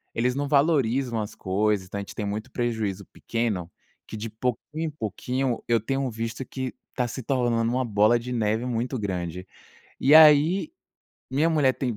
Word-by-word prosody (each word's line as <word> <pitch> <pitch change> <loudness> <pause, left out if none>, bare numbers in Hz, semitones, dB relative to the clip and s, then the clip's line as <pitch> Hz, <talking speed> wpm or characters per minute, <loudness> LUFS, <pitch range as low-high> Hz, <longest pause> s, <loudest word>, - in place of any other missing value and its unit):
eles 125 +2 +1
não 145 0 -1
valorizam 135 -5 +2
as 105 - -6
coisas. 100 +1 0
Então 100 - -5
a - - -2
gente - - -9
tem 105 - -3
muito 105 +5 -4
prejuízo 110 -5 -2
pequeno 105 -7 -2 0.4
que 110 - -7
de 110 +1 -5
pouquinho 125 +7 -3
em - - -1
pouquinho, 125 0 -2
eu 115 -1 +3
tenho 135 +2 -1
visto 115 +3 -4
que 130 -1 -5 0.2
tá 125 -2 0
se 130 - -6
tornando 120 -3 +1
uma 130 0 0
bola 105 +2 +4
de 125 +2 -7
neve 110 +1 0
muito 125 +2 -2
grande. 90 -2 -4 0.5
E 140 +3 +4
aí 160 - +6 0.6
minha 150 +5 +2
mulher 145 -5 +3
tem 125 -5 -2
120 Hz, 175 wpm, -25 LUFS, 105-135 Hz, 0.6 s, aí